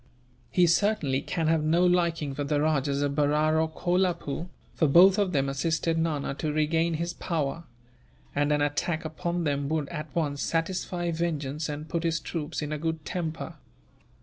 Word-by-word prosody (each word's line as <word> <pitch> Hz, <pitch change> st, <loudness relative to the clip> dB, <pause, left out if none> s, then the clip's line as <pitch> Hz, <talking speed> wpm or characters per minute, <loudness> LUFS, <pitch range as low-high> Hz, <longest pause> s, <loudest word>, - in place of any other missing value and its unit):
He 180 Hz, -, +4 dB
certainly 170 Hz, -6 st, +2 dB
can 165 Hz, +2 st, -2 dB
have 160 Hz, -1 st, +2 dB
no 165 Hz, +4 st, +3 dB
liking 170 Hz, -5 st, +1 dB
for 145 Hz, -, -3 dB
the 145 Hz, +1 st, 0 dB
Rajahs 145 Hz, -2 st, +1 dB
of 140 Hz, -1 st, 0 dB
Berar 150 Hz, +2 st, +2 dB
or 160 Hz, -, 0 dB
Kolapoore, 175 Hz, -2 st, -1 dB, 0.3 s
for 160 Hz, -, +2 dB
both 185 Hz, +7 st, +7 dB
of 200 Hz, -3 st, +1 dB
them 140 Hz, -4 st, +1 dB
assisted 160 Hz, +4 st, 0 dB
Nana 160 Hz, -4 st, -1 dB
to 155 Hz, -, -1 dB
regain 160 Hz, +2 st, +1 dB
his 170 Hz, +2 st, -2 dB
power; 165 Hz, 0 st, -2 dB, 0.7 s
and 145 Hz, +1 st, +1 dB
an 150 Hz, 0 st, +2 dB
attack 155 Hz, +3 st, -1 dB
upon 170 Hz, +2 st, -2 dB
them 140 Hz, -2 st, -1 dB
would, 155 Hz, -2 st, 0 dB
at 155 Hz, -2 st, -5 dB
once, 145 Hz, -4 st, -1 dB
satisfy 175 Hz, +1 st, -1 dB
vengeance 155 Hz, -3 st, -2 dB
and 150 Hz, +1 st, -5 dB
put 170 Hz, 0 st, -2 dB
his 165 Hz, -1 st, 0 dB
troops 155 Hz, -1 st, -4 dB
in 150 Hz, -, -4 dB
a 150 Hz, -, -2 dB
good 160 Hz, -1 st, -3 dB
temper." 160 Hz, +1 st, -4 dB
160 Hz, 175 wpm, -27 LUFS, 145-170 Hz, 0.7 s, both